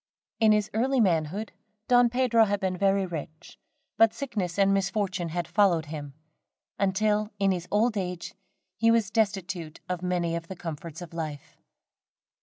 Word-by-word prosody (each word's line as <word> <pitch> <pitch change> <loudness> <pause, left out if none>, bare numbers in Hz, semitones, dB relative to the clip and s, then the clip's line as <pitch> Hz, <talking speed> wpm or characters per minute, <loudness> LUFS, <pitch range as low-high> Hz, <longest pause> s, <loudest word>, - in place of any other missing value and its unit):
In 220 -1 +5
his 210 -1 +2
early 255 +4 +1
manhood, 185 +1 +1 0.4
Don 245 -1 +5
Pedro 235 -2 +3
had 205 -1 -1
been 190 -1 -1
very 195 +1 +2
rich, 155 -2 -8 0.4
but 225 0 +5
sickness 205 -10 -3
and 195 0 +4
misfortune 195 -3 -1
had 175 0 -3
followed 175 -5 +3
him, 145 -3 -7 0.6
until, 210 +2 +1
in 195 -1 +2
his 180 -1 -3
old 220 +2 +2
age, 180 -3 -4 0.4
he 225 +3 +3
was 225 -3 +2
destitute 195 -7 -1
of 180 -1 -3
many 175 -2 -1
of 170 0 -5
the 190 - -7
comforts 165 0 -7
of 170 - -12
life. 155 -4 -6
195 Hz, 155 wpm, -27 LUFS, 170-215 Hz, 0.6 s, In